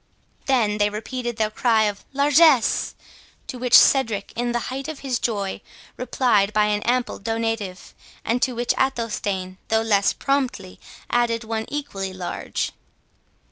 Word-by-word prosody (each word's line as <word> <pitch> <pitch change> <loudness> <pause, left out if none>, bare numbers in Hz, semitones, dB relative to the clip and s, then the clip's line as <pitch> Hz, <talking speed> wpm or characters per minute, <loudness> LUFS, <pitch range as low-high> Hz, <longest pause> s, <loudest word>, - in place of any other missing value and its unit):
They 225 -6 +2
then 205 0 +2
repeated 240 +2 -4
their 215 -1 0
cry 225 -1 +2
of 205 -1 -2
Largesse, 280 -2 +4 0.5
to 255 - -7
which 250 0 +3
Cedric, 225 -7 +3
in 240 +1 -1
the 240 - 0 0.2
height 270 +2 -5
of 315 -3 -7
his 260 -3 -1
joy, 200 -4 -2 0.3
replied 230 -5 +1
by 210 0 +3
an 210 0 0
ample 245 +1 -1
donative, 225 -3 -3 0.3
and 235 +2 0
to 255 - +1
which 240 +1 0
Athelstane, 205 -7 -2
though 220 0 +2
less 200 -3 +3
promptly, 260 -9 -2 0.3
added 235 -1 +1
one 220 0 -3
equally 195 -10 -4
large. 185 -1 -4
230 Hz, 140 wpm, -23 LUFS, 210-255 Hz, 0.5 s, Largesse